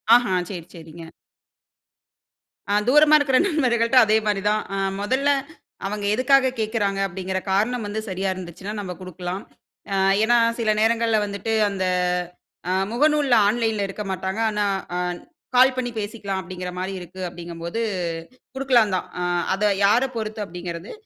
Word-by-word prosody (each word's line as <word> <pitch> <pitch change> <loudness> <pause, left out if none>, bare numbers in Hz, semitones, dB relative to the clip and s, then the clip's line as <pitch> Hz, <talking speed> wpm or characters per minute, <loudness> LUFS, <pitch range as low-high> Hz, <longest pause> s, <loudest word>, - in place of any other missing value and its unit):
ஆஹ, 245 0 +4 0.2
சரி 175 -4 -6
சரிங்க. 165 0 -11 1.7
அ, - - +2
தூரமா 300 +3 +6
இருக்கிற 270 -3 +3
நண்பர்கள்ட்ட 250 - +2
அதே 215 0 +3
மாரி 205 -2 0
தான், 215 0 +1
அ - - -2 0.2
மொதல்ல 260 +7 +1 0.6
அவங்க 205 0 -4
எதுக்காக 260 +1 +4
கேக்குறாங்க, 210 -3 -1
அப்படிங்கிற 190 +1 -3
காரணம் 220 +4 +1
வந்து 210 +1 -3
சரியா 190 +1 -2
இருந்துச்சுன்னா 185 +3 -7
நம்ம 190 -3 -5
குடுக்கலாம். 185 +1 -6 0.5
அ, - - +1 0.3
ஏன்னா 240 +1 +4 0.2
சில 220 -2 +2
நேரங்கள்ள 225 0 +2
வந்துட்டு 200 +2 -3 0.2
அந்த 190 -2 -2 0.9
அ - - +2 0.2
முகநூல்ல, 290 0 +3
ஆன்லைன்ல 220 -2 0
இருக்க 205 +2 -6
மாட்டாங்க. 190 +3 -3
ஆனா, 210 -1 0 0.3
ஆ - - -1 0.6
கால் 255 +1 +6
பண்ணி 250 -1 -1
பேசிக்கலாம் 205 -2 -3
அப்டிங்கிற 180 0 -6
மாரி 190 +1 -3
இருக்கு, 180 +2 -11
அப்டிங்கும்போது 170 +4 -6 0.7
குடுக்கலாந்தான். 235 -8 +2
அ, - - 0 0.3
அதை 210 +2 +1 0.2
யாரப் 250 +6 +3
பொறுத்து 215 -1 -4
அப்டிங்கிறது, 175 0 -7
210 Hz, 135 wpm, -23 LUFS, 185-240 Hz, 1.7 s, தூரமா